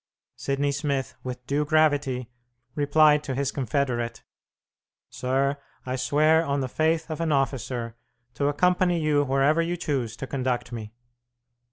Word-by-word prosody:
Sidney 140 +1 -1
Smith, 140 -1 -2
with 125 -1 -6
due 140 +3 0
gravity, 145 -5 +1 0.4
replied 150 +1 +4
to 135 -3 -3
his 140 0 -1
confederate. 125 -3 -2 0.9
"Sir, 135 +2 0 0.3
I 130 0 -2
swear 155 +5 +3
on 140 -3 -1
the 130 - -1
faith 160 +4 0
of 155 - -3
an 165 -2 0
officer 125 -4 -1 0.4
to 140 - 0
accompany 180 +3 +2
you 150 -2 +2
wherever 140 +4 +2
you 175 +1 -1
choose 130 -9 -2
to 135 - -5
conduct 125 -3 -2
me." 110 -3 -6
140 Hz, 140 wpm, -25 LUFS, 130-155 Hz, 0.9 s, replied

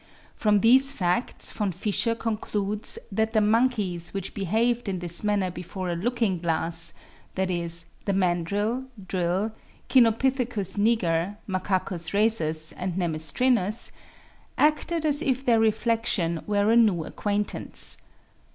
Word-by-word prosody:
From 210 -2 +2
these 260 +5 +5
facts 180 -2 +1
Von 205 -3 -2
Fischer 210 +5 0
concludes 210 -2 -2
that 220 +2 0
the 220 - +4
monkeys 210 -6 +1
which 195 -1 -4
behaved 225 +4 0
in 190 - -2
this 175 +1 -2
manner 205 -3 0
before 180 +1 -6
a - - -2
looking 215 -1 -1
glass 165 0 0 0.4
(viz., 170 -3 -2 0.2
the 200 - 0
mandrill, 200 +7 0 0.2
drill, 185 +4 -1 0.4
Cynopithecus 235 -4 +2
niger, 205 -4 +1
Macacus 185 -3 -2
rhesus 160 -8 +1
and 180 -1 -4
nemestrinus) 185 - 0 0.7
acted 310 +2 +1
as 295 -1 +3
if 265 -4 -1
their 230 -2 +4
reflection 220 -6 +1
were 205 +1 +2
a - - +4
new 210 -8 +4
acquaintance. 205 0 0
205 Hz, 120 wpm, -25 LUFS, 180-230 Hz, 0.7 s, these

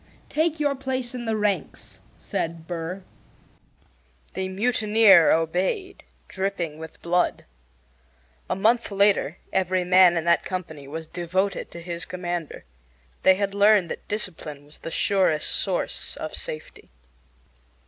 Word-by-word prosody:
"Take 315 0 0
your 290 -2 +2
place 260 -2 -1
in 245 -1 -5
the 220 -1 0
ranks," 205 -4 -2 0.2
said 165 0 -3
Burr. 175 +2 -5 1.3
The 190 0 -3
mutineer 210 -3 +5
obeyed, 180 - 0 0.3
dripping 185 -5 -3
with 160 -1 -10
blood. 175 +1 +1 1.0
A - - 0
month 230 +5 +2
later 200 -5 +2 0.2
every 185 -1 +1
man 180 -1 +6
in 165 - 0
that 170 0 +3
company 160 -6 -6
was 160 +3 -6
devoted 185 +4 -2
to 170 - -10
his 170 -1 -5
commander. 175 -3 -5 0.6
They 190 - +6
had 200 0 -1
learned 200 -3 +4
that - - -7
discipline 160 -8 -4
was 150 - -12
the - - -6
surest 185 -4 +2
source 190 -3 -1
of 155 - -6
safety. 155 - -8
185 Hz, 130 wpm, -25 LUFS, 165-205 Hz, 1.3 s, man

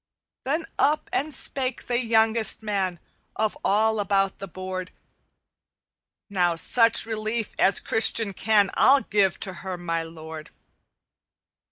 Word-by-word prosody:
"Then 310 +5 -1
up 300 +2 +1
and 305 +3 -1
spake 260 -3 -2
the 240 -1 0
youngest 225 -2 +2
man 190 -5 -2 0.4
Of 220 -1 -1
all 220 +2 +2
about 195 -1 0
the 195 - -6
board, 185 0 -6 1.4
'Now 180 -4 +1
such 230 +8 +3
relief 220 0 -3
as 195 - +4
Christian 225 -2 +1
can 205 0 +2
I'll 275 +1 +5
give 200 -6 +1
to 190 - -1
her, 185 -1 -5
my 165 -1 -2
lord.' 160 -1 -9
205 Hz, 125 wpm, -24 LUFS, 185-225 Hz, 1.4 s, I'll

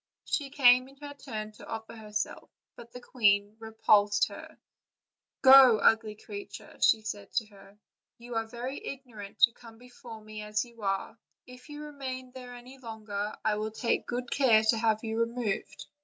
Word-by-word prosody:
She 285 -3 -2
came 255 -2 +5
in 270 - -17
her 285 0 -9
turn 220 -7 -7
to 210 - -14
offer 225 0 -7
herself, 210 -2 -5 0.3
but 235 0 -13
the 245 - -9
queen 205 -4 +2
repulsed 210 -2 +2
her: - - -11 0.9
"Go, 260 -3 +9
ugly 220 -1 +2
creature," 205 -1 -10
said 210 -2 +1
she 225 - +1
to 210 - -23
her; 200 0 -17 0.4
"you 240 +1 -10
are 225 -1 -1
very 245 +4 -6
ignorant 235 -7 -9
to 235 - +7
come 230 -1 -15
before 245 -2 -12
me 215 0 -9
as 210 +1 -2
you 235 -2 -17
are; 195 +2 -2 0.3
if 250 +3 -14
you 295 0 -8
remain 260 -3 -7
there 250 -1 -10
any 250 +2 -13
longer 215 -3 -5
I 210 -1 +2
will 215 +1 -2
take 230 +2 -1
good 245 0 -4
care 230 -6 +4
to 230 - -1
have 220 -1 +1
you 225 0 -3
re 230 - +2
moved." 230 -4 -4
225 Hz, 175 wpm, -29 LUFS, 215-250 Hz, 0.9 s, Go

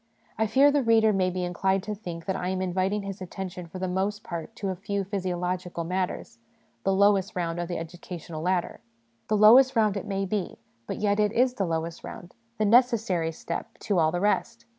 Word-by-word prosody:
I 220 - +1
fear 270 +7 +5
the 290 0 +2
reader 225 -3 +4
may 185 -1 +2
be 180 0 -3
inclined 190 +2 0
to 215 - -4
think 175 -5 -7
that 190 - -1
I 180 - -3
am 190 0 -1
inviting 185 +2 0
his 195 -1 -6
attention 185 -1 -6
for 165 - -9
the 185 0 -2
most 195 +3 -1
part 170 +6 -6
to 200 -3 -3
a 190 - -2
few 200 +2 -3
physiological 180 -2 -3
matters 180 -9 -3 0.4
the - - +2
lowest 200 +1 +3
round 170 -1 -2
of 175 - -2
the 175 - -3
educa 175 +2 -7
tional 160 -1 -7
ladder. 180 +1 -1 0.5
The 215 - +2
lowest 250 +6 +7
round 215 -3 +3
it 200 +1 -4
may 195 -1 -1
be, 195 -1 -3 0.3
but - - -4
yet 205 0 +1
it 210 -1 +3
is 250 +2 +3
the 195 -7 -1
lowest 165 0 -3
round, 180 - -9 0.2
the 215 - +1
necessary 220 -7 +3
step 170 +1 -6
to 200 -4 +1
all 160 -1 +3
the 175 - -1
rest. 210 +4 0
190 Hz, 210 wpm, -27 LUFS, 175-210 Hz, 0.5 s, lowest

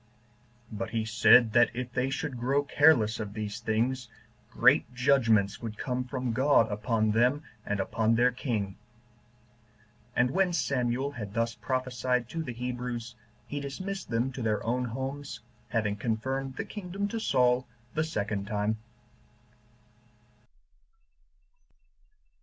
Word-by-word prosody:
But 110 +1 -4
he 110 -1 -1
said, 115 0 +6
that 120 0 +6
if 125 -1 -4
they 125 +1 0
should 135 -2 -3
grow 135 +4 +1
careless 140 -7 +4
of 105 -2 -5
these 105 0 -4
things, 120 +3 -1 0.4
great - - +4
judgments 115 -7 +3
would 110 -2 -6
come 125 -1 -2
from 125 -2 -3
God 130 -3 +4
upon 110 +1 +1
them, 125 +7 +2 0.2
and 105 -1 -1
upon 110 +3 +1
their 125 +2 +4
king. 110 -6 -3 1.4
And 125 +1 +3
when 185 +1 +2
Samuel 135 -3 0
had 105 -6 -7
thus 115 0 0
prophesied 125 -1 -1
to 165 - -3
the 150 - -4
Hebrews, 125 -1 -4 0.3
he 145 - -4
dismissed 185 +7 -5
them 120 +3 0
to 130 - -6
their 110 -1 -1
own 125 +2 0
homes, 135 +4 -5 0.3
having 105 -3 0
confirmed 130 +5 -2
the - - -4
kingdom 200 0 -4
to 225 - -3
Saul 125 - +2 0.3
the 155 - +1
second 105 -9 -3
time. 105 +1 0
125 Hz, 130 wpm, -29 LUFS, 110-135 Hz, 1.4 s, said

